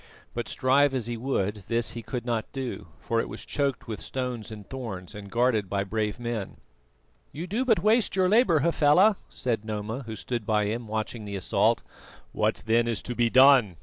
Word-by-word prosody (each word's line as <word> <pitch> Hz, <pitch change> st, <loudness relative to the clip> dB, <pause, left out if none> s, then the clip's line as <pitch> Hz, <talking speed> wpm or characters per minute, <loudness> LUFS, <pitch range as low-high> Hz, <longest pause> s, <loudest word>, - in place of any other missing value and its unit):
But, 120 Hz, -1 st, -4 dB
strive 135 Hz, +1 st, +3 dB
as 125 Hz, -4 st, -1 dB
he 120 Hz, 0 st, -2 dB
would, 110 Hz, -4 st, -1 dB
this 115 Hz, 0 st, 0 dB
he 115 Hz, -, -6 dB
could 120 Hz, +1 st, -5 dB
not 115 Hz, -3 st, -2 dB
do, 130 Hz, -9 st, -5 dB
for 115 Hz, -, 0 dB
it -, -, -6 dB
was -, -, -7 dB
choked 140 Hz, -3 st, -1 dB
with 110 Hz, -3 st, -5 dB
stones 125 Hz, -4 st, -4 dB
and 105 Hz, -3 st, -9 dB
thorns 110 Hz, -8 st, -6 dB
and 100 Hz, -1 st, -9 dB
guarded 115 Hz, -3 st, +1 dB
by 100 Hz, -1 st, 0 dB
brave 105 Hz, +2 st, -2 dB
men. 115 Hz, -5 st, -4 dB, 0.7 s
"You 160 Hz, +4 st, -5 dB
do 215 Hz, +8 st, -1 dB
but 225 Hz, -9 st, +2 dB
waste 215 Hz, 0 st, +3 dB
your 185 Hz, -1 st, +3 dB
labour, 190 Hz, -, +4 dB
Hafela," 170 Hz, +6 st, +4 dB
said 115 Hz, -4 st, -2 dB
Noma, 110 Hz, +3 st, -4 dB
who 110 Hz, -, -5 dB
stood 120 Hz, +2 st, -4 dB
by 105 Hz, -1 st, +1 dB
him 115 Hz, +2 st, -3 dB
watching 110 Hz, +1 st, -4 dB
the 100 Hz, -1 st, -5 dB
assault. 95 Hz, -2 st, +1 dB, 0.5 s
"What -, -, 0 dB
then 115 Hz, +1 st, +3 dB
is 115 Hz, -4 st, -2 dB
to 120 Hz, -, -4 dB
be 120 Hz, -1 st, +2 dB
done?" 130 Hz, -, +6 dB
120 Hz, 195 wpm, -27 LUFS, 110-135 Hz, 0.7 s, done